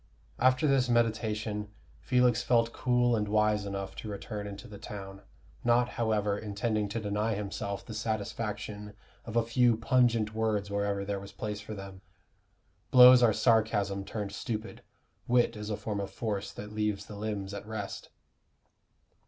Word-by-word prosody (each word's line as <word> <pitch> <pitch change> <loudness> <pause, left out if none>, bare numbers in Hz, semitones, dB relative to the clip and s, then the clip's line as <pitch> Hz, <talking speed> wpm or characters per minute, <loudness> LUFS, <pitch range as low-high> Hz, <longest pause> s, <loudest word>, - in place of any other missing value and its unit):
After 130 +3 +4
this 135 -4 +3
meditation, 110 -3 0 0.3
Felix 125 -2 +3
felt 115 -1 +2
cool 125 -1 +2
and 105 -2 -1
wise 105 -1 +2
enough 100 -1 -5
to 110 - -6
return 105 0 -5
into 100 0 -8
the 100 -1 -10
town, 100 -3 -8 0.4
not, 120 +1 +3
however, 105 -3 0
intending 105 0 -1
to 110 +3 -2
deny 105 +1 -1
himself 100 0 -4
the 110 - -7
satisfaction 105 -1 -4 0.3
of 115 - -7
a 115 -1 +3
few 120 -1 +3
pungent 115 -2 +2
words 110 -2 -1
wherever 100 -1 -1
there 100 0 -2
was 100 0 -10
place 105 -1 -5
for 105 0 -7
them. 100 -1 -9 0.9
Blows 125 0 +9
are 120 -2 +6
sarcasms 105 -4 +2
turned 105 -3 -4
stupid: 110 +2 -5 0.5
wit 120 -1 +3
is 105 0 -6
a 105 - -2
form 105 -2 -3
of 100 -1 -3
force 105 -3 -3
that 105 +1 -9
leaves 105 -2 -1
the 105 - -9
limbs 100 -2 -4
at 100 +1 -7
rest. 110 -3 -6
105 Hz, 155 wpm, -30 LUFS, 100-115 Hz, 0.9 s, Blows